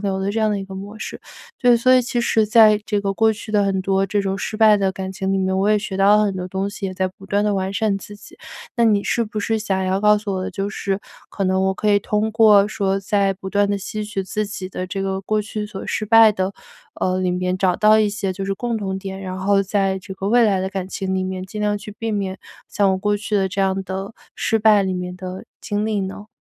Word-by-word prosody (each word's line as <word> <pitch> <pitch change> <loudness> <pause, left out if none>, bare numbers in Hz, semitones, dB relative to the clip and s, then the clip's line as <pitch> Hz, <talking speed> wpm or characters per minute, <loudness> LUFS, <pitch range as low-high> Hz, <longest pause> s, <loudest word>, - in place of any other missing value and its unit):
流 195 -1 -1
的 190 +1 -1
这 225 - -1
样 215 - +2
的 205 - -1
一 - - -6
个 195 - -11
模 200 +3 -8
式。 - - -7 0.4
对， 245 -1 +5
所 255 +2 +3
以 255 - +6
其 240 0 -2
实 220 -2 +2
在 215 -1 +6
这 205 -1 0
个 200 -1 -1
过 220 +2 +3
去 215 0 -9
的 205 -1 +2
很 195 -1 0
多 195 0 +1
这 205 +1 0
种 195 0 -2
失 215 - -4
败 215 -1 +6
的 195 -2 0
感 190 0 -5
情 190 0 -2
里 195 - +1
面， 190 0 0
我 195 +2 +2
也 215 - +4
学 200 -2 -5
到 200 +2 +5
了 210 - +3
很 195 -2 -1
多 180 - -4
东 190 +2 -3
西， 200 -1 -5
也 185 - -5
在 185 0 0
不 195 +1 -16
断 205 +1 +1
地 210 - +1
完 190 0 -2
善 210 -2 0
自 205 - -11
己。 - - -15 0.4
那 235 - +3
你 210 -3 +3
是 235 +2 0
不 215 0 -5
是 220 +2 0
想 195 -3 -1
要 190 +1 0
告 210 0 +5
诉 205 -1 -4
我 185 - -2
的， - - -4
就 200 0 -3
是 195 -1 -2 0.3
可 200 - -5
能 190 0 +1
我 190 0 +1
可 210 - 0
以 205 - +5
通 210 +2 -1
过 210 -2 +5
说 195 -2 -1
在 200 -1 +1
不 190 0 -8
断 205 0 +2
地 200 - 0
吸 210 +2 -5
取 205 -2 -3
自 210 +3 -3
己 195 -2 -6
的 185 0 -5
这 195 +1 -4
个 190 0 -2
过 215 +2 -1
去 210 0 -5
所 205 -2 -8
失 215 - -2
败 225 0 +7
的， 190 -2 -2 0.5
呃， 185 0 +1
里 185 -1 0
面 180 0 -1
找 185 -2 +2
到 215 0 +5
一 215 - +3
些 200 -2 -3
就 195 +1 -5
是 195 0 -1
共 235 +2 -2
同 195 -3 -3
点， 190 0 -6
然 185 -1 -5
后 195 +1 +2
在 195 -1 0
这 190 +1 -9
个 195 +1 -3
未 240 +2 +5
来 195 -4 +2
的 190 - -2
感 190 -1 -4
情 190 -1 -3
里 185 0 -1
面 185 0 -4
尽 210 +3 -7
量 210 0 +1
去 205 +1 -9
避 225 -1 -2
免 195 -2 -3 0.3
像 200 -1 +1
我 - - +1
过 205 +2 0
去 210 +1 -4
的 195 -2 +2
这 195 +1 -3
样 195 0 +1
的， 190 +3 -6 0.2
失 225 - +1
败 215 -2 +5
里 190 -1 -1
面 180 0 -4
的 185 0 -7 0.2
经 205 0 -2
历 215 -2 0
呢？ 195 +2 -6
200 Hz, 300 characters per minute, -21 LUFS, 190-210 Hz, 0.5 s, 败